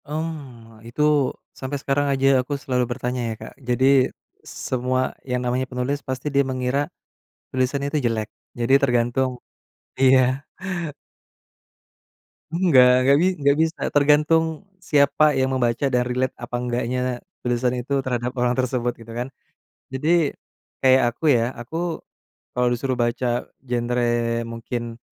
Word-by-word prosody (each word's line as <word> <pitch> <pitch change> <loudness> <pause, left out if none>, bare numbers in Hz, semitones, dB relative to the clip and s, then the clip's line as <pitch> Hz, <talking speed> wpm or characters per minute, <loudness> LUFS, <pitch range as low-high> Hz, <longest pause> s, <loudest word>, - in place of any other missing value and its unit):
Mmm. 140 -8 -6
Itu 120 +6 -4 0.6
sampai 130 +2 -3
sekarang 145 +1 0
aja 135 0 +2
aku 130 +3 -5
selalu 125 -2 0
bertanya, 125 +1 -3
ya, - - -2
Kak. - - -9 0.2
Jadi, 125 +2 +2 0.8
semua 130 0 0 0.3
yang 125 0 0
namanya 130 +1 -1
penulis 125 +3 -1
pasti 130 +2 -3
dia 140 - +4
mengira 130 +1 -1 0.7
tulisannya 130 +2 0
itu 155 - +2
jelek. 110 -2 -2 0.3
Jadi, 120 +3 +2
tergantung 125 0 +1 0.7
iya. 130 +1 +4 2.1
Enggak, 130 -8 +5
enggak 140 +1 +6
bi 180 - +4
enggak 140 0 +3
bisa. 160 +1 -3
Tergantung 150 +4 +3
siapa 150 -4 +3
yang 130 0 +1
membaca 120 +1 +1
dan 125 -2 +2
relate 125 +1 -1
apa 120 0 -6
enggaknya 125 0 -1 0.4
tulisan 120 0 0
itu 135 +2 -1
terhadap 125 0 -2
orang 125 -1 +1
tersebut, 125 -1 0
gitu, 115 0 -11
kan. 125 +3 -4 0.6
Jadi, 155 +3 +2 0.5
kayak 130 -2 +4
aku, 125 - -23
ya. 120 -2 +3
Aku 160 +7 -4 0.6
kalau 125 0 +3
disuruh 130 +1 -2
baca 120 0 0 0.2
genre, 120 -1 -1 0.4
mungkin 115 0 -5
130 Hz, 130 wpm, -23 LUFS, 120-140 Hz, 2.1 s, enggak